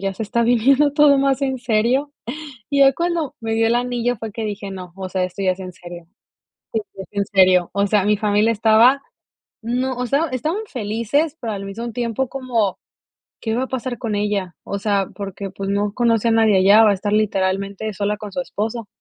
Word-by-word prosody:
"Ya 195 -1 -2
se 220 - -5
está 235 +2 0
viviendo 265 +5 +3
todo 290 -2 +5
más 275 0 +1
en 265 -1 -1
serio". 240 +5 +1 0.6
Y 280 - +2
ya 270 0 +7
cuando 340 -3 -2
me 225 -1 -3
dió 225 0 +2
el 235 - +2
anillo 245 0 0
fue 220 0 -6
que 220 +1 -4
dije: 205 -1 -5
"No, 180 -2 -8
o 190 -1 -6
sea, 185 0 -1
esto 185 +2 -6
ya 185 - +3
es 185 - -6
en 185 -1 -7
serio, 175 -1 -11 0.9
sí, 195 - -7
es - - -14
en 200 -1 -1
serio". 185 -3 +4
O 200 0 +2
sea, 200 -1 +2
mi 210 0 +3
familia 210 +1 +2
estaba, 230 +5 +4 0.6
no, 250 +3 -1
o 250 0 -2
sea, 280 +6 +1
estaban 315 - -2
felices, 240 +7 -1
pero 225 -2 -4
al 195 -1 -5
mismo 230 +4 -6
tiempo 240 +2 -2
como: 240 -7 -1 0.6
"¿Qué 225 0 -2
va 255 - 0
a - - -5
pasar 255 -2 -4
con 225 -4 -3
ella?", 205 -3 -1
o 200 - -4
sea, 200 -2 0
porque, 195 -1 -6
pues, 195 +1 -6
no 200 0 0
conoce 235 -1 +2
a - - +3
nadie 220 -3 +4
allá, 205 +4 +6
va 210 - +5
a - - +3
estar 205 +2 -3
literalmente 200 0 0
sola 205 +1 -1
con 210 -1 -8
su 270 - -2
esposo. 225 -2 -4
220 Hz, 215 wpm, -20 LUFS, 200-245 Hz, 0.9 s, ya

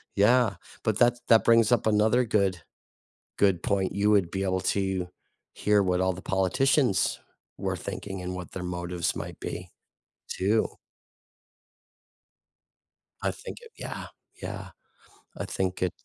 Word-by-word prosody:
Yeah, 110 +1 +4 0.3
but 110 -2 +1
that 120 0 +4
that 115 -1 +6
brings 115 -1 +5
up 120 - +3
another 110 +4 +3
good 100 -5 +1 0.8
good 95 -4 +3
point, 95 -2 0
you 100 +2 +2
would 100 -5 +3
be 95 0 -2
able 95 -1 +1
to 95 -2 0 0.5
hear 105 -1 +3
what 90 -1 +1
all 95 0 +2
the 90 - -9
politicians 120 +5 +2 0.4
were - - -2
thinking 95 -2 -6
and 90 0 -4
what 90 -2 -7
their 90 - -5
motives 90 -1 -2
might - - -6
be, - - -5 0.6
too. 105 +4 +1 2.5
I - - +1
think - - -9
it 465 -1 -14
yeah, - - -6 0.3
yeah. - - -6 0.7
I - - -3
think 95 -1 -2
it's 95 +4 -2
100 Hz, 140 wpm, -27 LUFS, 95-110 Hz, 2.5 s, that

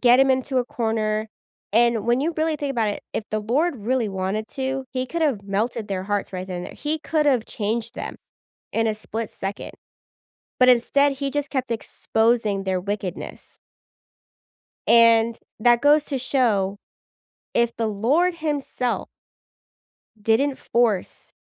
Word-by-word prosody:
get 245 +1 +6
him 270 0 +5
into 260 0 +1
a 245 - +1
corner, 220 -2 -1 0.4
and 230 -1 +3
when 240 +2 +3
you 325 +2 -1
really 315 0 +1
think 285 -1 -3
about 230 -5 +1
it, 205 - -4
if 215 - -3
the 215 - 0
Lord 275 +9 +1
really 235 +1 0
wanted 195 +3 -2
to, 265 0 -3
he 255 0 -1
could've 295 -9 0
melted 215 +3 -2
their 190 -1 -2
hearts 205 -1 -2
right 185 0 -4
then 180 -2 -4
and 175 - -5
there. - - -10
He 305 +1 -2
could've 290 -7 +1
changed 225 +1 -2
them - - -6 0.6
in 225 0 +1
a 215 - +1
split 220 +1 -5
second. 195 +1 -5 0.9
But 255 0 +6
instead, 280 +4 +4
he 275 0 -3
just 290 0 -2
kept 260 -3 -2
exposing 220 -2 0
their 185 -1 0
wickedness 200 -1 -5 1.3
and 230 0 +5 0.2
that 240 +2 +4
goes 295 +1 +5
to 275 - -2
show, 220 -7 +1 0.8
if 235 0 +2
the 225 - 0
Lord 275 - +2
himself 290 -6 -2 1.1
didn't 240 +6 +2
force 225 -6 0
235 Hz, 150 wpm, -23 LUFS, 215-270 Hz, 1.3 s, get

